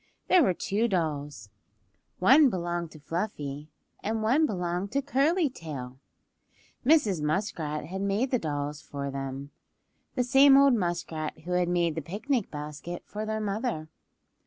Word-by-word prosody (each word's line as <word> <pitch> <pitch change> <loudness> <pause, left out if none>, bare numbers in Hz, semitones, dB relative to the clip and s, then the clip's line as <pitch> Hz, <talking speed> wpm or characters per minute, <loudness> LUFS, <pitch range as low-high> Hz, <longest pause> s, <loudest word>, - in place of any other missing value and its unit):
There 365 - +6
were 190 - +3
two 215 +7 0
dolls; 145 - -2 0.7
one 265 +9 +6
belonged 175 -4 -2
to 155 - -12
Fluffy, 150 -3 -4 0.3
and 220 +1 -2
one 275 +8 +3
belonged 180 -1 -2
to 280 - +2
Curly 295 +5 +2
Tail. 140 - -7 0.8
Mrs. 240 - +3
Muskrat 150 -2 -2
had 190 +4 -5
made 200 +6 0
the 250 - +2
dolls 145 -2 -3
for 140 -1 -5
them;—the 135 - -7
same 270 +2 +7
old 275 -1 +6
muskrat 170 -6 -2
who 175 +3 -7
had 180 -1 +2
made 175 -2 +1
the 160 - -3
picnic 215 - -2
basket 150 +4 -6
for 215 +1 -5
their 220 0 -1
mother. 210 -6 -2
180 Hz, 140 wpm, -28 LUFS, 150-235 Hz, 0.8 s, same